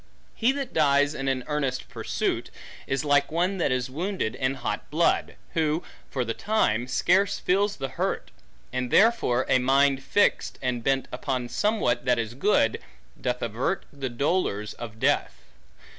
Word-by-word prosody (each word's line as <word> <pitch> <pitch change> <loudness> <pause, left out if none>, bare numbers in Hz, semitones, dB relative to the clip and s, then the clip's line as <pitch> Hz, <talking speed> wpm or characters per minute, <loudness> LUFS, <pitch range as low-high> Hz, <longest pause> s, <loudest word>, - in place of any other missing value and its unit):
He 240 +3 +2
that 275 -2 -4
dies 145 -1 +3
in 135 -2 -4
an 130 -1 0
earnest 140 -4 -2
pursuit, - - -2 0.4
is 135 +2 -1
like 145 0 +3
one 180 +4 0
that 155 - +1
is 130 -1 0
wounded 165 - -2
in 130 +1 -1
hot 130 - -4
blood; 165 +3 +1 0.2
who, 160 +1 +1 0.3
for 125 -3 -2
the 115 - -2
time, 125 - +1
scarce 185 +10 +2
feels 200 +3 +1
the 135 - -4
hurt; - - -2 0.4
and 125 -1 -1
therefore 195 - +3
a 130 - +4
mind 135 +1 +3
fixed, 205 +9 +1
and 125 -3 -2
bent 135 0 +1
upon 130 -3 -3
somewhat 205 - 0
that 125 -2 +3
is 115 -1 -2
good, 130 - +2 0.4
doth 125 -1 -1
avert 120 - -1
the 135 -2 -4
dolors 120 - -1
of 110 -2 -9
death. - - +1
135 Hz, 160 wpm, -26 LUFS, 125-170 Hz, 0.4 s, a